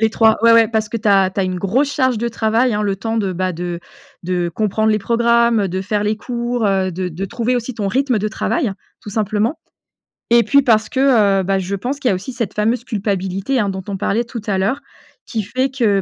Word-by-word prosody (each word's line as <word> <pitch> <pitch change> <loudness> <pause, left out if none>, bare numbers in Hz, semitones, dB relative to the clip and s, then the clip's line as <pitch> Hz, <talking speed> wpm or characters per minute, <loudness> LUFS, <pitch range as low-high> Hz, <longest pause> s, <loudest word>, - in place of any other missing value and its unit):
les 220 -1 +3
3, 220 -1 +3
ouais 230 - +6
ouais 230 -1 +6
parce 220 -2 -1
que 230 - -3
tu 215 -1 -1
as 195 -2 +4
tu - - 0
as 190 - +1
une 185 -1 -2
grosse 260 +10 0
charge 260 -5 +1
de 235 - -1
travail, 230 +1 +1
hein, 210 - -1
le 200 -1 -1
temps 225 +3 -3
de, 195 -3 -1
bah, 185 +1 -1
de 175 0 -4 0.4
de 175 -1 -1
comprendre 215 +4 0
les 215 - +2
programmes, 235 +1 +2
heu, 195 - 0
de 185 +2 -3
faire 205 +2 -1
les 210 +1 0
cours, 240 0 -2
heu, 190 -1 +1
de 180 +1 -3
de 180 +4 -5
trouver 235 +4 -1
aussi 245 0 -4
ton 205 -3 -2
rythme 255 +1 +1
de 215 - -1
travail, 220 - -1 0.3
tout 205 - -9
simplement. 215 +6 -1 0.7
Et 235 -1 +6
puis 280 0 +4
parce 220 -4 +2
que, 230 -8 +3
heu, - - -3
bah, 195 +1 0
je 190 +2 -3
pense 255 +8 -4
qu'il 260 - +1
y - - +3
a - - +1
aussi 195 +8 -6
cette 230 -5 -3
fameuse 230 +3 0
culpabilité, 200 +2 -2
hein, 205 -2 +1
dont 190 -1 -5
on 195 -1 -3
parlait 220 +4 0
tout 235 -1 -7
à 195 -2 0
l'heure, 220 +9 0 0.5
qui 220 -3 -3
fait 255 +6 -1
que 220 -7 +1
215 Hz, 245 wpm, -18 LUFS, 195-235 Hz, 0.7 s, ouais